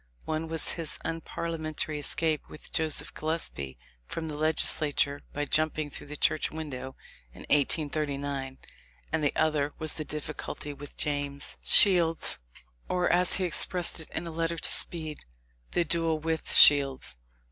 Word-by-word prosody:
One 160 +1 -3
was 160 -1 +2
his 165 -3 -2
unparlia 165 0 -4
mentary 155 -1 -2
escape 155 +1 0
with 155 - -11
Joseph 160 -2 +2
Gillespie 115 - -4 0.3
from 160 -1 -5
the 150 - -5
Leg 155 +1 +1
islature 145 -2 +1
by 145 0 -3
jumping 155 -1 0
through - - -6
the 150 +1 -7
church 155 - +1
window, 135 -4 -7 0.4
in - - -11
1839, 145 -2 0 0.6
and 160 -1 +1
the 145 - +1
other 150 -2 0
was 155 -1 0
the 155 - -3
difficulty 150 0 -5
with 145 0 -11
James 145 -1 -3
Shields, 170 - +5 0.5
or, 180 -1 +1
as 180 +1 +5
he 190 - 0
expressed 175 0 0
it 160 - -11
in 170 - -5
a 165 - -6
letter 165 +1 -2
to 160 - +1
Speed, 155 -3 +2 0.5
the 175 - +1
"duel 165 -1 +1
with 160 +1 -2
Shields." 135 - +6
155 Hz, 150 wpm, -28 LUFS, 145-165 Hz, 0.6 s, Shields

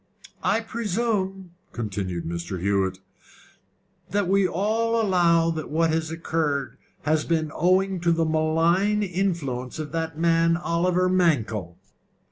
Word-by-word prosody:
"I 225 - +1
presume," 205 -4 -2 0.2
continued 100 -6 -4
Mr. 85 +2 -4
Hewett, 95 0 0 1.1
"that 205 -2 0
we 195 0 +3
all 225 +6 0
allow 170 -5 +3
that 155 -2 -5
what 165 +1 +2
has 160 0 -1
occurred 160 -4 -2 0.2
has 155 0 +1
been 160 -2 -1
owing 185 +2 +2
to 170 0 +2
the 165 0 +2
malign 165 +6 +2
influence 170 -10 -2
of 155 -2 -5
the 165 0 -2
man 165 +1 +3
Oliver 180 +1 +1
Mankell?" 120 - +1
165 Hz, 120 wpm, -24 LUFS, 150-185 Hz, 1.1 s, we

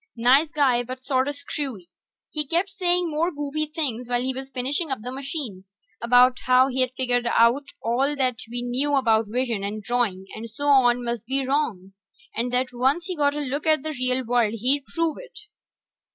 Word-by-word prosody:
Nice 260 +6 +4
guy, 275 -6 +2
but 255 +1 -7
sorta 265 +1 +1
screwy. 275 - -5 0.4
He 300 -2 0
kept 350 +6 0
saying 360 -3 +1
more 315 +3 +1
goofy 295 0 -3
things 260 -6 -3
while 245 0 0
he 260 +1 -1
was 265 +1 -7
finishing 275 +6 -1
up 265 -5 -3
the 250 - -5
machine, 265 - -5 0.4
about 250 +2 +5
how 255 +1 +5
he'd 255 -1 0
figured 245 -2 +1
out 235 +4 +3
that - - -15
all 265 +5 +1 0.3
we 245 +1 -4
knew 265 +4 0
about 225 -5 +2
vision 230 -2 -1
and 210 +1 -4
drawing 220 -5 0
and 225 +1 -7
so 285 +6 -1
on 245 -3 +4
must 235 -2 -4
be 270 +1 0
wrong, 240 -9 -2 0.4
and 245 +1 -1
that 250 +1 0
once 270 +8 +1
he 365 - -4
got 290 -2 +1
a 295 - -2
look 285 +2 -3
at 310 -3 +3
the 315 - -3
real 255 -2 0
world 230 -2 +1
he'd 265 +5 +1
prove 330 0 -2
it. - - -11
255 Hz, 190 wpm, -24 LUFS, 240-290 Hz, 0.4 s, about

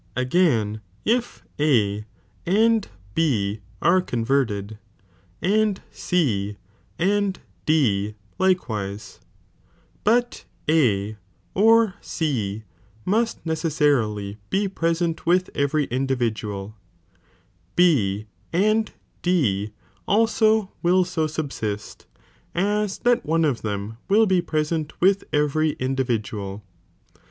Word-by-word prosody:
Again, 125 - +1 0.2
if 240 +2 0 0.2
A 105 -8 +2 0.4
and 220 +4 +3 0.3
B 110 -10 +1 0.2
are 185 +2 +5
converted, 115 - -1 0.6
and 210 +1 +2
C 105 - 0 0.4
Borbira. 185 +4 +2
and 200 -2 -1 0.3
D 110 -10 +2 0.2
likewise; 110 - -1 0.8
but 240 +3 +1 0.2
A 110 -9 +2 0.4
or 225 0 +5
C 110 -10 -2 0.4
must 225 +2 0
neceaaarilj 145 - 0
I)e 195 +1 +1
preaent 165 -2 -1
with 180 +1 +3
every 145 +1 +1
individual; 115 -6 -2 1.0
B 110 - +3 0.3
and 215 +5 +2 0.3
D 110 - +1 0.4
also 220 -1 +3
will 180 +1 +3
so 165 -3 -1
subsist, 135 -9 -5 0.5
as 205 +2 0
that 245 0 +2
one 165 +1 +2
of 140 -6 0
them 105 +1 -4
will 215 +3 +5
be 190 -3 +3
present 155 -1 -2
with 195 +2 +3
every 150 +1 +2
individual. 110 -6 -2
155 Hz, 90 wpm, -23 LUFS, -, 1.0 s, are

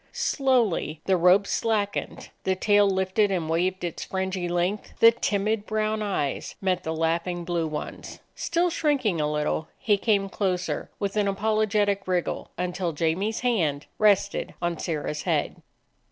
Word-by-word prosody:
Slowly 235 - +1
the 190 - +3
rope 180 +3 +5
slackened; 205 -1 -1
the 190 - +1
tail 205 +1 +4
lifted 190 +2 +1
and 180 -5 -1
waved 180 +3 0
its 170 -2 -3
fringy 190 -2 -2
length; 175 +4 -1
the 230 - +8
timid 210 -1 -1
brown 215 0 0
eyes 190 -10 -2
met 185 -2 0
the 160 - -3
laughing 170 +2 -1
blue 170 -2 -1
ones. 150 -1 -6 0.2
Still 340 +1 0
shrinking 265 - +1
a 150 0 0
little, 150 +1 -1
he 210 -6 +2
came 200 -2 +2
closer, 185 -2 -2
with 200 0 -3
an 205 -1 +2
apologetic 205 -1 +1
wriggle, 180 -2 -1
until 180 -1 -2
Jamie's 170 +8 -1
hand 165 - 0
rested 200 -1 +2
on 175 -2 -2
Sirrah's 150 -2 -3
head. - - -1
190 Hz, 145 wpm, -26 LUFS, 175-210 Hz, 0.2 s, the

